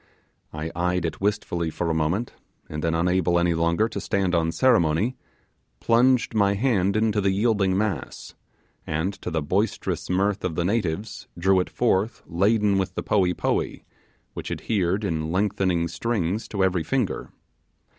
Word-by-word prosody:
I 80 Hz, +1 st, -5 dB
eyed 90 Hz, 0 st, 0 dB
it 80 Hz, +1 st, -4 dB
wistfully 90 Hz, -5 st, -1 dB
for 85 Hz, +1 st, -2 dB
a -, -, 0 dB
moment, 80 Hz, +9 st, -1 dB, 0.3 s
and 75 Hz, 0 st, -5 dB
then, 80 Hz, 0 st, +1 dB
unable 90 Hz, +1 st, +2 dB
any 85 Hz, 0 st, +2 dB
longer 85 Hz, +6 st, +1 dB
to -, -, -5 dB
stand 95 Hz, -2 st, 0 dB
on 80 Hz, -1 st, +2 dB
ceremony, 100 Hz, 0 st, +2 dB, 0.6 s
plunged 125 Hz, +1 st, +3 dB
my 100 Hz, -2 st, +3 dB
hand 100 Hz, -4 st, +1 dB
into 110 Hz, -1 st, +1 dB
the 100 Hz, -, +2 dB
yielding 100 Hz, -2 st, +2 dB
mass, 105 Hz, -4 st, -3 dB, 0.5 s
and 80 Hz, +6 st, -1 dB
to -, -, -4 dB
the 80 Hz, -3 st, -1 dB
boisterous 100 Hz, +9 st, -1 dB
mirth 95 Hz, +2 st, +1 dB
of 90 Hz, -3 st, -2 dB
the 85 Hz, -, 0 dB
natives 105 Hz, 0 st, -2 dB
drew 95 Hz, +2 st, +3 dB
it 90 Hz, -, -1 dB
forth 110 Hz, -2 st, 0 dB
laden 100 Hz, +3 st, +2 dB
with 95 Hz, -, -3 dB
the -, -, -3 dB
poee 90 Hz, -4 st, +2 dB
poee, -, -, -1 dB, 0.5 s
which -, -, -6 dB
adhered 100 Hz, -1 st, -1 dB
in 80 Hz, -5 st, -2 dB
lengthy 95 Hz, -3 st, +1 dB
strings 95 Hz, +2 st, -2 dB
to 100 Hz, -3 st, -1 dB
every 95 Hz, -2 st, +2 dB
finger. 130 Hz, -2 st, -1 dB
95 Hz, 155 wpm, -24 LUFS, 85-105 Hz, 0.6 s, plunged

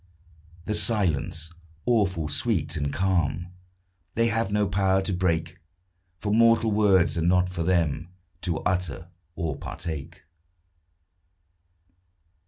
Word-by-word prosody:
The 105 Hz, -, -1 dB
silence 85 Hz, -7 st, +1 dB, 0.3 s
awful, 95 Hz, -9 st, +1 dB
sweet, -, -, 0 dB
and 70 Hz, -2 st, -1 dB
calm 90 Hz, -1 st, 0 dB, 0.6 s
They 115 Hz, +1 st, +3 dB
have 115 Hz, -2 st, 0 dB
no 105 Hz, 0 st, +2 dB
power 95 Hz, 0 st, +2 dB
to 95 Hz, -, -1 dB
break; 85 Hz, -1 st, -1 dB, 0.6 s
For 105 Hz, +3 st, -2 dB
mortal 115 Hz, 0 st, +4 dB
words 100 Hz, -5 st, +3 dB
are -, -, 0 dB
not 90 Hz, +2 st, +3 dB
for 90 Hz, -2 st, -4 dB
them 85 Hz, -2 st, 0 dB, 0.3 s
To 85 Hz, -3 st, -2 dB
utter 90 Hz, -1 st, -2 dB, 0.3 s
or 80 Hz, -4 st, -3 dB
partake. 80 Hz, +1 st, -6 dB
90 Hz, 110 wpm, -26 LUFS, 80-100 Hz, 0.6 s, mortal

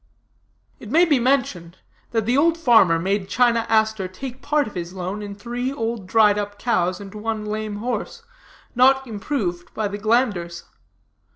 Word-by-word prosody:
"It -, -, -10 dB
may 340 Hz, +3 st, +5 dB
be 295 Hz, -6 st, +3 dB
mentioned, 240 Hz, -10 st, 0 dB, 0.3 s
that 225 Hz, -3 st, -1 dB
the 240 Hz, +3 st, +1 dB
old 325 Hz, +4 st, +3 dB
farmer 225 Hz, -, +5 dB
made 190 Hz, +3 st, -1 dB
China 235 Hz, -2 st, +2 dB
Aster 220 Hz, -3 st, +2 dB
take 250 Hz, +8 st, -8 dB
part 300 Hz, 0 st, +1 dB
of 215 Hz, -, -9 dB
his 175 Hz, 0 st, -5 dB
loan 190 Hz, +2 st, -5 dB
in 200 Hz, -1 st, -7 dB
three 245 Hz, +4 st, -4 dB
old 230 Hz, -6 st, -4 dB
dried 210 Hz, 0 st, +4 dB
up 205 Hz, 0 st, -5 dB
cows 185 Hz, -6 st, 0 dB
and 200 Hz, -1 st, -10 dB
one 215 Hz, 0 st, -4 dB
lame 215 Hz, 0 st, -4 dB
horse, 250 Hz, -, -4 dB, 0.5 s
not 265 Hz, +2 st, +4 dB
improved 205 Hz, -6 st, -4 dB
by 215 Hz, -1 st, -1 dB
the 205 Hz, +1 st, -6 dB
glanders. 205 Hz, -6 st, 0 dB
220 Hz, 165 wpm, -22 LUFS, 195-245 Hz, 0.5 s, may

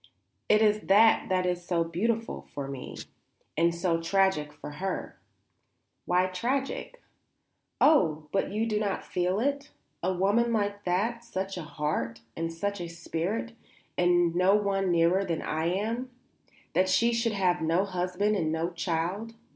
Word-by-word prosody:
It 215 Hz, +1 st, +5 dB
is 210 Hz, 0 st, +4 dB
that 220 Hz, +3 st, +5 dB
that 185 Hz, -1 st, +1 dB
is 180 Hz, -1 st, -1 dB
so 175 Hz, -1 st, +1 dB
beautiful 220 Hz, +7 st, -2 dB
for 140 Hz, -1 st, -3 dB
me 135 Hz, -2 st, -7 dB, 0.6 s
and 170 Hz, +2 st, +4 dB
so 170 Hz, -1 st, 0 dB
tragic 170 Hz, -4 st, +2 dB
for 150 Hz, 0 st, -9 dB
her." 190 Hz, -1 st, -3 dB, 0.9 s
"Why 180 Hz, +1 st, +3 dB
tragic?" 265 Hz, -, -3 dB, 0.8 s
"Oh, 160 Hz, -, +4 dB
but 195 Hz, -, 0 dB
you 215 Hz, +2 st, 0 dB
do 215 Hz, -2 st, 0 dB
not 205 Hz, -2 st, -2 dB
feel 180 Hz, +2 st, 0 dB
it? 280 Hz, +3 st, -1 dB, 0.3 s
A 185 Hz, -, +1 dB
woman 205 Hz, +6 st, +2 dB
like 205 Hz, -2 st, -1 dB
that, 220 Hz, +7 st, 0 dB
such 195 Hz, -4 st, -4 dB
a 180 Hz, -, -4 dB
heart, 150 Hz, -7 st, -3 dB
and 165 Hz, 0 st, -2 dB
such 200 Hz, +3 st, -3 dB
a 170 Hz, -, -4 dB
spirit 170 Hz, +7 st, -3 dB, 0.4 s
and 175 Hz, -1 st, +3 dB
no 185 Hz, +3 st, +4 dB
one 195 Hz, -2 st, +1 dB
nearer 175 Hz, +3 st, +3 dB
than 170 Hz, -4 st, -2 dB
I 160 Hz, +1 st, -1 dB
am? 225 Hz, +8 st, -1 dB, 0.6 s
That 185 Hz, +1 st, +3 dB
she 230 Hz, +6 st, +3 dB
should 230 Hz, -1 st, +1 dB
have 185 Hz, -4 st, +1 dB
no 165 Hz, +4 st, +2 dB
husband 185 Hz, +2 st, 0 dB
and 160 Hz, -5 st, 0 dB
no 165 Hz, +2 st, -1 dB
child? 180 Hz, +6 st, -2 dB
185 Hz, 155 wpm, -28 LUFS, 170-210 Hz, 0.9 s, It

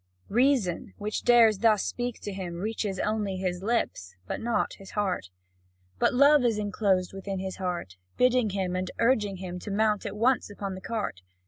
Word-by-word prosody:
Reason, 240 Hz, -6 st, +1 dB
which 210 Hz, +1 st, -3 dB
dares 230 Hz, -4 st, +5 dB
thus 215 Hz, -3 st, +4 dB
speak 245 Hz, -1 st, -3 dB
to 205 Hz, -, -5 dB
him, 185 Hz, -3 st, -5 dB
reaches 205 Hz, +1 st, -2 dB
only 210 Hz, -2 st, -1 dB
his 180 Hz, -1 st, -2 dB
lips, 190 Hz, -, -1 dB
but -, -, -4 dB
not 230 Hz, -3 st, 0 dB
his 195 Hz, -, -11 dB
heart; 190 Hz, -, -1 dB, 0.7 s
but -, -, +3 dB
love 280 Hz, +2 st, +6 dB
is 230 Hz, -3 st, +2 dB
enclosed 200 Hz, -3 st, 0 dB
within 195 Hz, 0 st, -5 dB
his 190 Hz, 0 st, -4 dB
heart, 175 Hz, -, -4 dB, 0.2 s
bidding 250 Hz, -3 st, +3 dB
him 190 Hz, -2 st, -2 dB
and 185 Hz, 0 st, -2 dB
urging 220 Hz, -5 st, +2 dB
him 180 Hz, -1 st, -6 dB
to 205 Hz, -, -8 dB
mount 210 Hz, +1 st, +1 dB
at 205 Hz, +1 st, -6 dB
once 245 Hz, +2 st, +2 dB
upon 200 Hz, -1 st, -5 dB
the 185 Hz, -, -8 dB
cart. 210 Hz, -, -3 dB
205 Hz, 180 wpm, -27 LUFS, 185-225 Hz, 0.7 s, love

